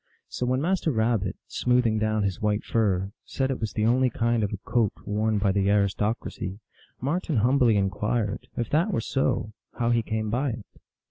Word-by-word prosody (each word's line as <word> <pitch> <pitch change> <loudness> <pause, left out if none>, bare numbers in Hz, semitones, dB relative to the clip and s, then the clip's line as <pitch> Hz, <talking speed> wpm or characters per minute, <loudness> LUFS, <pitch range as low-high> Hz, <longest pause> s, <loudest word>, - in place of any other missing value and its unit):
So 125 - -3
when 130 +1 +1
Master 180 -1 +1
Rabbit, 110 -5 0
smoothing 125 -3 +2
down 110 -1 +1
his 100 -3 -2
white 105 0 +1
fur, 100 -4 0
said 135 0 -1
it 130 - -3
was 110 -2 -3
the 110 - 0
only 125 +3 +3
kind 115 -1 0
of 100 - -1
a 105 - -3
coat 110 0 +1
worn 105 +1 0
by 100 -1 +2
the 100 0 +1
aristocracy, 100 -1 -1 0.4
Marten 150 +2 -1
humbly 120 -1 +4
inquired, 100 +2 -1
" - - -30
if 120 - -1
that 165 +7 +3
were 175 - 0
so, 115 -2 -1 0.2
how 120 0 +1
he 120 -1 +3
came 110 -1 -2
by 130 +2 0
it." 115 -3 -8
110 Hz, 190 wpm, -26 LUFS, 105-125 Hz, 0.4 s, humbly